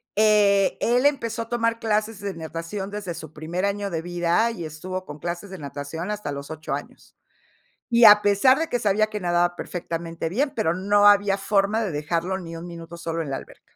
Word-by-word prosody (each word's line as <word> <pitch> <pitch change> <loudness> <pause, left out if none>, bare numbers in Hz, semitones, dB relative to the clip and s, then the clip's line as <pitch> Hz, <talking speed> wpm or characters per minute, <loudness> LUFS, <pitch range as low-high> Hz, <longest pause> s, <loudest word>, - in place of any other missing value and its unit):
eh, 205 -2 +4
él 245 +3 +2
empezó 230 -6 +1
a 230 - -16
tomar 230 -1 0
clases 215 -1 -1
de 200 -1 -3
natación 165 +5 -5
desde 200 -4 -4
su 160 -2 -9
primer 170 +5 -3
año 200 0 -1
de 165 -2 -3
vida 175 +6 +1
y 175 -7 -6
estuvo 185 +4 -5
con 150 0 -9
clases 175 +4 -5
de 190 - -8
natación 145 +6 -5
hasta 210 -8 -4
los 140 +1 -6
8 155 -1 -5
años, - - -8 0.8
y 235 0 +6
a 210 0 +9
pesar 205 +7 +5
de 325 0 -2
que 245 - 0
sabía 215 0 +2
que 210 - -3
nadaba 175 -1 +1
perfectamente 165 -2 -4
bien, 275 - 0
pero 170 -7 +1
no 205 +3 +4
había 200 -1 +5
forma 205 +2 +1
de 195 - -2
dejarlo 170 +5 -2
ni 165 -2 -8
1 170 - -8
minuto 170 0 -9
solo 165 0 -3
en 150 - -5
la 135 - -2
alberca. - - -13
190 Hz, 205 wpm, -24 LUFS, 165-210 Hz, 0.8 s, a